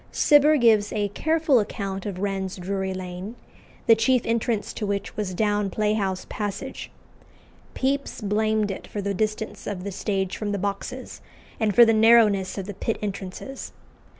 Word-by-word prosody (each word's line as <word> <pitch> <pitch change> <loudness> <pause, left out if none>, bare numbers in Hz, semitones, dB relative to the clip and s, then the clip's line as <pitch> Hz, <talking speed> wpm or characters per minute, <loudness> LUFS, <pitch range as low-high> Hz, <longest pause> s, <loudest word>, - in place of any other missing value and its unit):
Cibber 300 0 +5
gives 220 -5 +4
a 205 -1 -1
careful 315 +3 +2
account 195 -2 -4
of 195 -3 -4
Wren's 190 -1 -2
Drury 190 +1 -3
Lane, 185 +3 -6 0.5
the 230 - +7
chief 230 +2 +2
entrance 230 -1 -1
to 210 - -3
which 200 0 -3
was 195 -4 -3
down 205 0 +1
Playhouse 205 -2 -1
Passage. 205 -2 -5 0.9
Pepys 275 +1 -1
blamed 215 0 +1
it 190 - -7
for 210 - -5
the 200 0 -1
distance 215 +2 -3
of 190 -3 -4
the 200 - -4
stage 195 -1 -2
from 205 -1 -3
the - - 0
boxes, 200 +1 -5 0.4
and 215 -3 +1
for 235 - +9
the 225 - +4
narrowness 215 -4 +4
of 195 - -3
the 205 - -6
pit 225 +4 -2
entrances. 200 +6 -6
205 Hz, 160 wpm, -24 LUFS, 195-225 Hz, 0.9 s, for